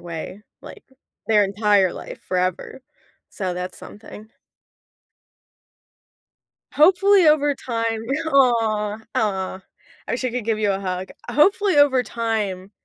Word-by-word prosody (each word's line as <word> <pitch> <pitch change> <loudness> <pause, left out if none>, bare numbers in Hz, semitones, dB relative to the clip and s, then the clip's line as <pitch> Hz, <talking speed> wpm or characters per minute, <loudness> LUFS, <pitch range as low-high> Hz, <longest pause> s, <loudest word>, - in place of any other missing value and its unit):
way, 175 +4 -8 0.2
like, - - -12 0.4
their 210 -2 +4
entire 200 -2 +2
life, - - -9
forever. 185 +6 -2 0.5
So, 190 -3 -4
that's 180 +1 -6
something. 215 +1 -13 2.4
Hopefully, 370 +4 +4
over 295 -1 +3
time 230 -3 -3 0.3
aw, 225 -5 +2 0.2
aw, 190 -3 -2 0.5
I - - -3
wish 250 +2 -3
I 250 - 0
could 245 -2 -4
give 220 -2 0
you 205 -2 +1
a 195 - -3
hug. 185 -1 -4 0.2
Hopefully, 395 +4 +3
over 280 -3 +4
time, 215 -5 -3
220 Hz, 115 wpm, -21 LUFS, 195-260 Hz, 2.4 s, their